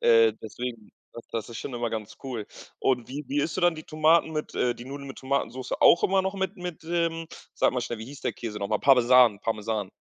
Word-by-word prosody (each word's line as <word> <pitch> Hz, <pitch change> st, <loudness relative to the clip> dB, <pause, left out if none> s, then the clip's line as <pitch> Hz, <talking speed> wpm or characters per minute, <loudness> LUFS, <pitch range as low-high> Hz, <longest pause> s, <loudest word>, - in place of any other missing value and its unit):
Äh, 115 Hz, -2 st, +5 dB
deswegen, 115 Hz, 0 st, -6 dB, 0.2 s
das 115 Hz, -, -9 dB
das 115 Hz, -1 st, -3 dB
ist 115 Hz, -, -8 dB
schon -, -, -6 dB
immer 120 Hz, -1 st, -2 dB
ganz 110 Hz, -1 st, -6 dB
cool. 120 Hz, -6 st, -5 dB, 0.3 s
Und 125 Hz, -3 st, 0 dB
wie 145 Hz, +3 st, -5 dB
wie 145 Hz, -, -1 dB
isst 155 Hz, -, -2 dB
du 185 Hz, -, -2 dB
dann 175 Hz, -1 st, +4 dB
die 155 Hz, -, -9 dB
Tomaten 160 Hz, +1 st, +3 dB
mit 150 Hz, -1 st, -4 dB
äh, 120 Hz, -1 st, +1 dB
die 120 Hz, -, -10 dB
Nudeln 140 Hz, +1 st, -7 dB
mit 135 Hz, -, -8 dB
Tomatensoße 130 Hz, -2 st, -2 dB
auch 170 Hz, -, +6 dB
immer 190 Hz, 0 st, +3 dB
noch 190 Hz, +1 st, -2 dB
mit 190 Hz, +2 st, -2 dB
mit, 180 Hz, -3 st, -6 dB
ähm, 165 Hz, -1 st, -1 dB, 0.3 s
sag -, -, +2 dB
mal 125 Hz, -, -1 dB
schnell, 120 Hz, -1 st, -4 dB
wie 110 Hz, -, -6 dB
hieß 140 Hz, +3 st, -10 dB
der -, -, -2 dB
Käse 110 Hz, -3 st, -5 dB
noch 100 Hz, -1 st, -3 dB
mal? 110 Hz, -, +2 dB
Parmesan, 125 Hz, -4 st, +5 dB
Parmesan. 110 Hz, -3 st, -2 dB
125 Hz, 240 wpm, -27 LUFS, 115-155 Hz, 0.3 s, auch